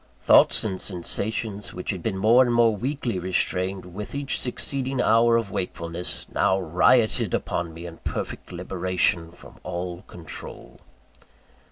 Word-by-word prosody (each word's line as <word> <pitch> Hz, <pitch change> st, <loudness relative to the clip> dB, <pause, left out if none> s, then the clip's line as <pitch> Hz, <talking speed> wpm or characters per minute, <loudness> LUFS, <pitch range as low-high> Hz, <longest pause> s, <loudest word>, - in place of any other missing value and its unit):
Thoughts -, -, +5 dB
and 95 Hz, -4 st, -3 dB
sensations 100 Hz, +3 st, -2 dB
which 90 Hz, -, -3 dB
had 95 Hz, -4 st, -5 dB
been 100 Hz, -1 st, -2 dB
more 115 Hz, +6 st, +6 dB
and 120 Hz, -, 0 dB
more 115 Hz, -2 st, +4 dB
weakly 125 Hz, -3 st, -2 dB
restrained 90 Hz, 0 st, -1 dB
with 105 Hz, +7 st, -6 dB
each 140 Hz, -1 st, 0 dB
succeeding 130 Hz, +1 st, -2 dB
hour 115 Hz, 0 st, +4 dB
of 110 Hz, -4 st, -2 dB
wakefulness, 85 Hz, -1 st, -4 dB
now 95 Hz, +1 st, +2 dB
rioted 95 Hz, +6 st, +3 dB
within 85 Hz, -1 st, -2 dB
me 85 Hz, +2 st, -9 dB
in 85 Hz, -1 st, -8 dB
perfect -, -, -5 dB
liberation 90 Hz, -2 st, 0 dB
from 85 Hz, -, -15 dB
all 90 Hz, 0 st, -4 dB
control. 85 Hz, -2 st, -9 dB
95 Hz, 140 wpm, -25 LUFS, 90-115 Hz, -, more